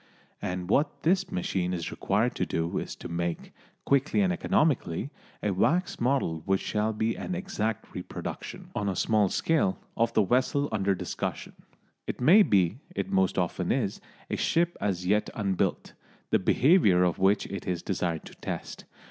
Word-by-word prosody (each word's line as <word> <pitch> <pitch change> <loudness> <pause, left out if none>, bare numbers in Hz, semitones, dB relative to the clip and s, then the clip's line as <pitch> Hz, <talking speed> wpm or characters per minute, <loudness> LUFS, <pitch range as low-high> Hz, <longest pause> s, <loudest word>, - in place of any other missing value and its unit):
And 90 -1 -3
what 140 - +1
this 185 +3 +2
machine 90 0 -1
is 85 -2 -4
required - - 0
to - - +1
do 80 +1 -1
is - - -6
to - - -8
make, 85 0 -3 0.3
quickly 140 +8 +2
and 185 -2 +2
economically, 150 - +1 0.3
a 105 - +1
wax 170 - +1
model 120 - +1
which 95 0 +3
shall 105 +1 0
be 110 +1 -1
an 185 - -4
exact 115 - -3
reproduction, - - -7
on 100 -1 -1
a 95 - -2
small 105 +1 +2
scale, 150 - +1 0.2
of 115 0 +2
the 110 - +4
vessel 130 +6 +1
under 100 -2 +1
discussion. 90 -1 -4 0.5
It - - -4
may 170 +12 +7
be 100 - +3 0.2
it - - -3
most 95 -1 +2
often - - 0
is - - -1 0.3
a - - 0
ship 170 +1 +1
as 90 -3 -1
yet 105 +3 +2
unbuilt, 100 -4 -1 0.4
the - - +4
behaviour 105 - +4
of 90 -2 +1
which 100 +2 +3
it 100 +1 -6
is 90 -2 -2
desired 85 -4 -2
to - - -11
test. - - -6
105 Hz, 165 wpm, -28 LUFS, 90-140 Hz, 0.5 s, may